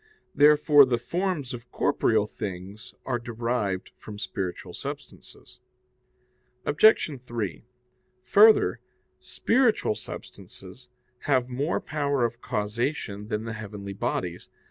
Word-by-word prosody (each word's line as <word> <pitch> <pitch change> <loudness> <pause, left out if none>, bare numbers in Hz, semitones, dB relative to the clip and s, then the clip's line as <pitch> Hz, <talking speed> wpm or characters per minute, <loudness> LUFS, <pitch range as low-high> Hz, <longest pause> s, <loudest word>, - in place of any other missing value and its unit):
Therefore 150 0 +6
the 125 -3 +1
forms 170 -1 -2
of 120 0 -9
corporeal 110 -7 +2
things 100 +2 -8
are 120 -2 -1
derived 115 -5 -2
from 105 -1 -9
spiritual 95 -3 -5
substances. - - -9 1.1
Obj. 150 - +4
3: 115 - -4 0.6
Further, 215 +2 +5 0.4
spiritual 230 - +1
substances 100 +4 -11 0.4
have 130 -3 +2
more 140 +6 -1
power 140 -4 0
of 120 +1 -5
causation 105 -1 -3
than 105 0 -2
the 115 0 -5
heavenly 100 -2 -7
bodies. 90 -2 -3
120 Hz, 100 wpm, -26 LUFS, 105-145 Hz, 1.1 s, Therefore